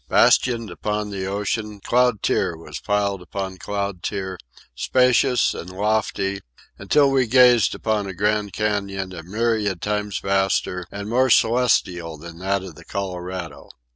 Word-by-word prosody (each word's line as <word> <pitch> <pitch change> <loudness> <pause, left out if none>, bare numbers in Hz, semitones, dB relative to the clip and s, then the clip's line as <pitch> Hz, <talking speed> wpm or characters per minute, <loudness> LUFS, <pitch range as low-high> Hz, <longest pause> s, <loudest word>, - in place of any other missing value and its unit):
Bastioned 115 -5 +3
upon 105 +3 -3
the 95 -1 -4
ocean 105 +1 -3
cloud 125 0 +2
tier 85 - +1
was 75 -2 -8
piled 100 -2 0
upon 95 +1 -5
cloud 100 -3 -3
tier, 95 -2 -4 0.3
spacious 125 - +3
and 85 - -7
lofty, 100 0 -1 0.4
until 145 -2 +3
we 130 -2 +2
gazed 125 -3 +5
upon 105 -2 -1
a 95 - -5
Grand 105 +1 0
Canyon 100 -3 -2
a 85 - -7
myriad 105 +1 -1
times 105 -1 -2
vaster 95 -2 0
and 100 0 -6
more 130 +4 +2
celestial 105 -10 +2
than 85 +2 -11
that 95 +1 -1
of 95 -3 -8
the 75 - -14
Colorado. 90 -5 -5
100 Hz, 140 wpm, -22 LUFS, 95-110 Hz, 0.4 s, gazed